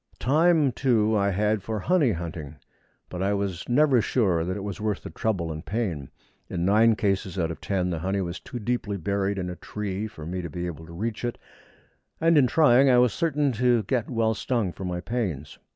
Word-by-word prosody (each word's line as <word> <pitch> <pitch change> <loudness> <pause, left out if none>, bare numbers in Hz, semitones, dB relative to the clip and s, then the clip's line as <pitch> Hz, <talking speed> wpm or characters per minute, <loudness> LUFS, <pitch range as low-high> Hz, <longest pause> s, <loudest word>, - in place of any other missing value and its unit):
Time, 155 +1 +3
too, 110 -4 +2
I 100 -1 +2
had 105 +2 +1
for 110 +2 -3
honey 155 - +3
hunting, 80 -3 -6 0.5
but 90 - -6
I 100 +1 +1
was 100 -2 -3
never 135 -1 +4
sure 95 -9 +1
that 95 +3 -3
it 100 - -5
was 100 +1 -5
worth 105 -2 -2
the - - -7
trouble 90 -7 -1
and 80 +1 -6
pain. 95 - -3 0.4
In 85 -1 -2
nine 110 +3 +5
cases 95 -3 -1
out 85 -2 0
of 80 - -8
ten 90 -2 -1
the 85 - -2
honey 95 +4 -1
was 85 -1 -4
too - - -8
deeply 110 -3 -2
buried 100 +2 -1
in 90 -2 -3
a 90 - -5
tree 105 +2 -4
for 80 -8 -10
me 90 +2 -3
to 85 - -6
be 90 +3 -4
able 80 -2 -7
to - - -11
reach 110 +7 -4
it, 120 -1 -2 0.8
and 165 +1 +4
in 140 -4 +5
trying 135 -1 +5
I 125 - +5
was 125 -2 +4
certain 150 -4 +1
to 120 -1 +2
get 120 +3 -1
well 115 -3 +1
stung 110 -4 -1
for 95 - -7
my 90 -1 -3
pains. 90 - -4
105 Hz, 215 wpm, -26 LUFS, 90-120 Hz, 0.8 s, nine